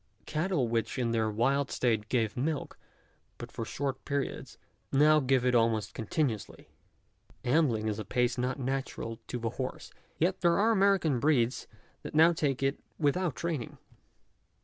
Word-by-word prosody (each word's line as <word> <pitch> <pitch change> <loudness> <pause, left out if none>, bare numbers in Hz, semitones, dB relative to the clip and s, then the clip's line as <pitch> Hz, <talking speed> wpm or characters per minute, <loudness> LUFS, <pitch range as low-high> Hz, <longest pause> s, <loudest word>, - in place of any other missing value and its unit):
Cattle 155 -4 0
which 115 +3 -1
in 120 -2 0
their 110 -1 +1
wild 135 +6 +1
state 110 -3 0
gave 115 -5 0
milk 145 +4 -3 0.6
but - - -8
for - - -5
short 135 -1 -3
periods, 140 -1 -3 0.3
now 155 +2 +5
give 130 -2 +2
it 125 - +3
almost 115 -3 +2
continuously. 115 -1 -3 0.8
Ambling 120 -6 +2
is 105 0 -2
a - - -3
pace 125 +1 0
not 125 +2 -1
natural 130 -4 -3
to 125 - -3
the 115 -1 -2
horse; 130 +1 -5 0.3
yet 185 +3 0
there 170 -1 +4
are 220 +3 +4
American 195 - +3
breeds 130 -4 +1 0.3
that - - -8
now 165 +2 +6
take 145 -5 0
to 135 - -1
it 135 - -9 0.2
without 160 +1 +1
training. 160 -8 -4
135 Hz, 155 wpm, -30 LUFS, 115-155 Hz, 0.8 s, now